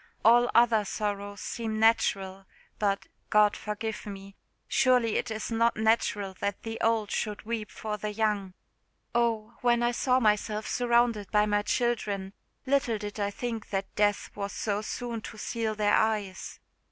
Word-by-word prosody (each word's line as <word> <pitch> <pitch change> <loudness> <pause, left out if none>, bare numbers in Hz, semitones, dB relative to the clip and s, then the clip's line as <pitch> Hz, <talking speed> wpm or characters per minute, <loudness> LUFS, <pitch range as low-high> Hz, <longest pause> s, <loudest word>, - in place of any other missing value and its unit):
All 240 +2 +6
other 230 -2 +5
sorrows 205 -1 -3
seem 220 -2 -3
natural, 195 -4 +2 0.3
but 200 -1 0 0.2
God 210 -1 +5
forgive 210 +1 -5
me! 195 -1 -9 0.3
surely 250 -4 +3
it - - -2
is 220 +1 -4
not 230 0 +2
natural 215 -3 +1
that 200 -1 -3
the 225 0 -5
old 225 -2 +1
should 210 -1 -2
weep 220 -1 -3
for 215 -1 -5
the 210 +1 -3
young. 205 -3 -1 0.6
Oh! 230 -1 0
when 240 -1 +3
I 240 - +3
saw 255 +1 +2
myself 215 -1 +1
surrounded 235 -4 +1
by 210 -1 +3
my 205 0 +1
children, 205 -4 -1 0.3
little 265 -4 +1
did 205 0 -6
I 200 0 0
think 225 +1 -5
that 195 -1 -3
death 205 -1 +1
was 200 -1 -4
so 205 -1 -1
soon 235 +1 -4
to 220 - -9
seal 220 0 -2
their 210 -1 +2
eyes! 210 -4 -1
215 Hz, 155 wpm, -28 LUFS, 205-230 Hz, 0.6 s, All